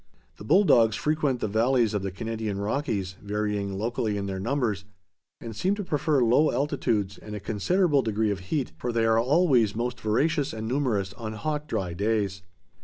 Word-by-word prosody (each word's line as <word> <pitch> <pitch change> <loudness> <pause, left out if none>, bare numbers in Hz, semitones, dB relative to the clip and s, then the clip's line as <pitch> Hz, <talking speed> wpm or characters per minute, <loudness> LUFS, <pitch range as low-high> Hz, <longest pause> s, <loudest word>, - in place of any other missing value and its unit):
The - - -10
bull 180 - +4
dogs 115 - +4
frequent 150 -4 0
the - - 0
valleys 115 +1 +2
of 105 - 0
the 95 - -2
Canadian 110 +1 -4
Rockies, 100 -4 -2
varying 105 -1 -2
locally 110 -1 -1
in 100 - -3
their 95 -1 -4
numbers, 115 -4 -1 0.6
and 115 -2 -8
seem 190 - +1
to 205 - -4
prefer 150 -5 +1
low 125 +7 +4
altitudes 115 -9 -1
and 105 0 -8
a - - -4
considerable 140 - +1
degree 110 -2 0
of 100 - -3
heat, 145 -5 -1
for 120 - -2
they 115 -1 +1
are 115 0 +4
always 125 - +3
most 120 +2 -3
voracious 145 +7 +1
and 110 0 -5
numerous 115 -7 0
on 110 -1 -6
hot 150 +7 -3
dry 90 - -2
days. 100 0 -1
115 Hz, 180 wpm, -26 LUFS, 105-140 Hz, 0.6 s, bull